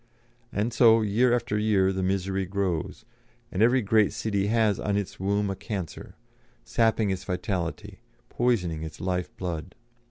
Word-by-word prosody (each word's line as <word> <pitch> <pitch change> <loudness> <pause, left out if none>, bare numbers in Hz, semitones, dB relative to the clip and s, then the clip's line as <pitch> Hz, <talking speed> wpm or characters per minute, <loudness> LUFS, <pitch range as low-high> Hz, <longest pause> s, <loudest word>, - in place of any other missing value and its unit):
And 110 +3 -1
so, 115 -1 +6
year 115 +4 +2
after 120 -3 0
year, 100 -3 +2
the 95 - -2
misery 95 0 -1
grows, 95 -4 -2 0.5
and 95 - -2
every 120 +2 +4
great 105 0 +3
city 100 -2 -1
has 110 -2 +2
on 100 0 0
its 100 -2 -4
womb 100 +1 0
a - - -3
cancer; 95 -4 -6 0.5
sapping 110 - +1
its 95 -1 -3
vitality, 90 -2 -4 0.3
poisoning 95 -10 0
its 80 -1 -7
life 90 -1 -2
blood. 85 -1 -5
100 Hz, 150 wpm, -26 LUFS, 95-110 Hz, 0.5 s, so